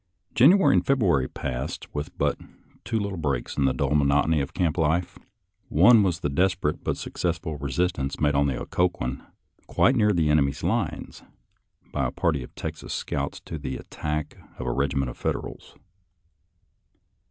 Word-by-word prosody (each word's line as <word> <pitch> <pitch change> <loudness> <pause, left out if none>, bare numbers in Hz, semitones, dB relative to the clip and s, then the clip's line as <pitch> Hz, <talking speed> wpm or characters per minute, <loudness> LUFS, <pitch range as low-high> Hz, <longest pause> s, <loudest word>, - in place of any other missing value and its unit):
January 180 +11 +6
and - - +3
February 95 - +3
passed 65 -2 -5
with 75 0 -5
but - - +1 0.5
two 115 - -1
little 100 -3 -3
breaks 70 -6 -2
in 70 - +1
the 65 - +3
dull 70 +2 -1
monotony 75 +2 +3
of 70 - -4
camp 85 -4 +1
life. 80 +3 0 0.5
One 105 +9 +6
was 90 -5 0
the - - 0
desperate 90 0 0
but - - -1
successful 80 -3 -3
resistance 70 0 -1
made 75 -1 +2
on 70 0 +3
the 65 -3 -2
Occoquan, 80 -7 -1 0.5
quite 130 - +3
near 105 -3 +4
the 80 -6 +2
enemy's 70 -3 +1
lines, - - -2 0.7
by - - 0
a - - -5
party 80 -5 0
of 60 - -11
Texas 80 -1 -5
scouts - - -3
to 80 - -7
the 65 -2 -4
attack 75 0 -4 0.2
of 65 - -5
a - - 0
regiment 70 -1 0
of - - -13
Federals. - - -4
75 Hz, 160 wpm, -25 LUFS, 70-90 Hz, 0.7 s, January